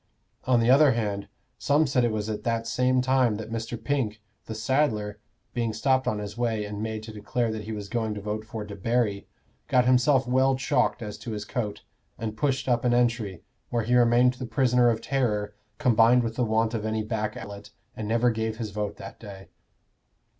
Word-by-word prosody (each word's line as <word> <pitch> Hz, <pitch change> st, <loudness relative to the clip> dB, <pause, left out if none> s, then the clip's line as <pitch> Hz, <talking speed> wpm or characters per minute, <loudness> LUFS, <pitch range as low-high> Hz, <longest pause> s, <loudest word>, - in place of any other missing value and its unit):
On 125 Hz, -2 st, +4 dB
the 115 Hz, +2 st, +4 dB
other 140 Hz, 0 st, +6 dB
hand, 100 Hz, -3 st, -2 dB, 0.3 s
some 145 Hz, +2 st, +3 dB
said 130 Hz, -3 st, +1 dB
it 120 Hz, -, +2 dB
was 105 Hz, -1 st, -2 dB
at 110 Hz, -1 st, -4 dB
the 115 Hz, -1 st, 0 dB
same 125 Hz, +2 st, +1 dB
time 130 Hz, -4 st, +3 dB
that 110 Hz, +1 st, -7 dB
Mr. 115 Hz, +1 st, -4 dB
Pink, 115 Hz, -6 st, -1 dB, 0.3 s
the 110 Hz, -, -5 dB
saddler, 110 Hz, -4 st, 0 dB, 0.3 s
being 115 Hz, -3 st, -1 dB
stopped 130 Hz, +4 st, +1 dB
on 105 Hz, -, +1 dB
his 105 Hz, 0 st, -6 dB
way 115 Hz, -3 st, -1 dB
and 105 Hz, 0 st, -5 dB
made 110 Hz, 0 st, -4 dB
to 110 Hz, 0 st, -9 dB
declare 110 Hz, +2 st, -1 dB
that 110 Hz, -1 st, -5 dB
he 110 Hz, -, -5 dB
was 105 Hz, -2 st, -5 dB
going 110 Hz, 0 st, -2 dB
to -, -, -4 dB
vote 105 Hz, +1 st, -4 dB
for 110 Hz, -1 st, -6 dB
Debarry, 105 Hz, +1 st, -1 dB, 0.4 s
got 125 Hz, -1 st, +3 dB
himself 130 Hz, +2 st, +4 dB
well 130 Hz, +1 st, +3 dB
chalked 130 Hz, -2 st, 0 dB
as 105 Hz, -1 st, -7 dB
to 115 Hz, 0 st, -6 dB
his 105 Hz, -1 st, -5 dB
coat, 105 Hz, -3 st, -4 dB, 0.3 s
and 110 Hz, -1 st, -4 dB
pushed 135 Hz, +3 st, 0 dB
up 120 Hz, -2 st, +2 dB
an 120 Hz, -1 st, +3 dB
entry, 115 Hz, -7 st, 0 dB, 0.3 s
where 120 Hz, -2 st, 0 dB
he 120 Hz, +3 st, 0 dB
remained 120 Hz, +1 st, +5 dB
the 125 Hz, -1 st, -7 dB
prisoner 125 Hz, -2 st, +3 dB
of 115 Hz, -1 st, 0 dB
terror 105 Hz, -7 st, -1 dB, 0.2 s
combined 120 Hz, -3 st, +4 dB
with 115 Hz, -1 st, -3 dB
the 125 Hz, -, +1 dB
want 110 Hz, +1 st, +1 dB
of 110 Hz, -2 st, -2 dB
any 110 Hz, 0 st, -1 dB
back 105 Hz, -1 st, -3 dB
outlet, 100 Hz, 0 st, -9 dB, 0.3 s
and 110 Hz, -, -5 dB
never 115 Hz, +2 st, +3 dB
gave 110 Hz, -1 st, -2 dB
his 110 Hz, -2 st, -4 dB
vote 105 Hz, 0 st, -3 dB
that -, -, -10 dB
day. 100 Hz, -3 st, -11 dB
115 Hz, 205 wpm, -26 LUFS, 105-125 Hz, 0.4 s, other